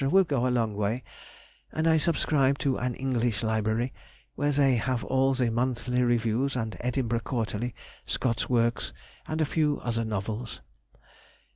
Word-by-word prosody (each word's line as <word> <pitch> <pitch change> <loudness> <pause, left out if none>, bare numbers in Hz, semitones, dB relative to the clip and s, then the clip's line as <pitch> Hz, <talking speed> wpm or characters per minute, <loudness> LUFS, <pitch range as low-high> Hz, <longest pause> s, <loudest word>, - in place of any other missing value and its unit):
will 195 +5 +6
go 140 -7 0
a - - +2
long 115 -4 +1
way; 105 +4 -1 0.7
and 160 +1 0
I 160 0 +5
subscribe 145 -4 +2
to 135 0 +1
an 125 0 -2
English 120 -6 0
library, 110 +3 0 0.4
where 145 0 0
they 135 -3 +4
have 125 0 -1
all 135 0 +2
the 125 -3 +1
monthly 125 +1 0
reviews 120 +2 +1
and 110 -3 -2
Edinburgh 120 -2 0
Quarterly, 115 -1 -2 0.3
Scott's 115 -3 0
works, 115 -1 +1 0.3
and 155 0 -1
a - - +4
few 150 -1 +1
other 115 -1 -1
novels.... 110 +2 -4
125 Hz, 150 wpm, -28 LUFS, 115-135 Hz, 0.7 s, will